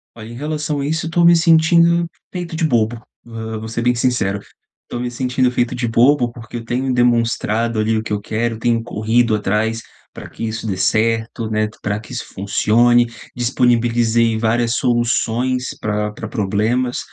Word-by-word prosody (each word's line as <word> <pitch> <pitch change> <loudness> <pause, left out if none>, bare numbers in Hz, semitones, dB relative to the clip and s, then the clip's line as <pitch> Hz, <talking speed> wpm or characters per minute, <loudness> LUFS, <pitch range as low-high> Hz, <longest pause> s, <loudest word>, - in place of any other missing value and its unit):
Olha, 110 -1 -10
em - - -9
relação 150 +1 -3
a 140 - -2
isso, 160 +1 -1
eu - - -4
tô 170 0 +2
me 170 0 +7
sentindo 170 +1 +4 0.3
feito 175 -3 -5
de 160 - -1
bobo, 115 -5 +1 0.3
hã, 110 -1 -6
vou 110 +1 -7
ser 115 +1 -3
bem 125 +1 +2
sincero, 120 -5 0 0.5
tô 120 - -5
me 125 0 -3
sentindo 125 +1 0
feito 120 -1 -1
de 120 -1 -2
bobo, 120 +2 +3
porque 120 0 -9
eu 115 - -6
tenho 130 +3 -1
demonstrado 115 -2 +1
ali 110 +1 +1
o 110 - -1
que 110 - -5
eu 105 - -1
quero, 110 +2 -2
tenho 115 0 +1
corrido 115 0 +1
atrás, 105 +2 -1 0.3
pra - - -10
que - - -7
isso 110 0 -4
dê 95 - -2
certo, 110 +3 0
né, 110 0 0
pra 105 0 -2
que 110 - -12
isso 125 - -4
funcione, 120 +5 +3 0.3
disponibilizei 120 -2 +2
várias 115 +1 +1
soluções 125 +1 0
pra 105 0 -1
pra 110 - -7
problemas, 110 +4 0
120 Hz, 180 wpm, -18 LUFS, 110-125 Hz, 0.5 s, me